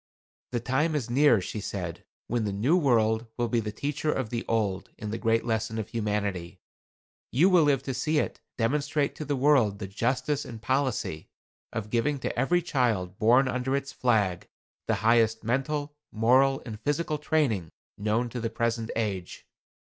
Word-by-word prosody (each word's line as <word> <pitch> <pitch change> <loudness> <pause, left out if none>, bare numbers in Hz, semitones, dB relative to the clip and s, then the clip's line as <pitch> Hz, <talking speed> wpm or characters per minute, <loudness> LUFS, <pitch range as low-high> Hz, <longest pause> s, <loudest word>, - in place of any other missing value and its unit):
"The 120 - 0
time 145 +7 0
is 120 -5 -2
near," 135 -3 +5
she 95 +4 -5
said, 90 -4 -5 0.2
"when 120 -1 -1
the 105 - -1
New 115 - +2
World 115 -7 +2
will 120 -1 0
be 120 - +2
the 105 -1 -3
teacher 145 +6 -2
of 130 -7 -2
the 120 -1 -2
Old 105 -5 -1
in 105 -1 -5
the 115 - -3
great 115 0 +1
lesson 110 -1 -1
of 110 -2 -4
Humanity. 100 -5 -2 0.7
You 190 - +4
will 180 -2 +6
live 140 -2 +2
to 135 - -3
see 150 +5 0
it - - -1 0.2
demonstrate 145 +4 0
to 155 - -5
the 145 0 0
world 130 -7 +3
the 100 - -5
justice 130 +8 -1
and 115 -2 -8
policy 130 - -1 0.4
of 105 -2 -5
giving 135 +5 +1
to - - -2
every 170 +8 +2
child 110 - 0
born 120 +5 +5
under 130 +1 -1
its 140 0 -3
flag 105 -8 +1 0.4
the - - +2
highest 115 -1 +3
mental, 145 +5 -1 0.2
moral 130 +5 +3
and 110 -4 -7
physical 150 +3 -1
training 135 - 0 0.3
known 110 +4 0
to 120 - -5
the 115 - -1
present 115 0 -1
age. 100 -6 -3
120 Hz, 175 wpm, -27 LUFS, 110-140 Hz, 0.7 s, will